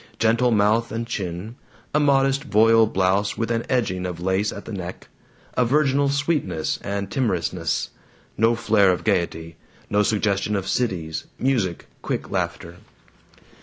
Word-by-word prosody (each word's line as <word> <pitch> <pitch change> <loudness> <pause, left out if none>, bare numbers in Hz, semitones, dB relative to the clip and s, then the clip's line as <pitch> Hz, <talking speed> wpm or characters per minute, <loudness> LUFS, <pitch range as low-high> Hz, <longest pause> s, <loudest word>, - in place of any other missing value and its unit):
Gentle 115 +2 +3
mouth 110 +1 +2
and 115 +1 -3
chin. 100 +1 -5 0.4
A 150 - +3
modest 135 -1 +2
voile 115 -1 +5
blouse 95 +1 +1
with 115 0 -1
an 115 0 0
edging 100 -8 0
of 90 -2 -6
lace 95 +3 0
at 100 - -8
the 115 - -7
neck. 90 -2 -7 0.4
A 125 - +2
virginal 140 +2 +2
sweetness 140 - -1
and 100 0 -3
timorousness 90 - -1 0.4
no 115 +2 +3
flare 110 -4 +3
of 90 - -2
gaiety, 85 -2 -1 0.3
no 105 0 +3
suggestion 105 -1 0
of 95 -1 -2
cities, 85 -10 -2
music, 115 -10 0 0.2
quick - - -4
laughter. 85 +1 -3
105 Hz, 140 wpm, -23 LUFS, 95-120 Hz, 0.4 s, voile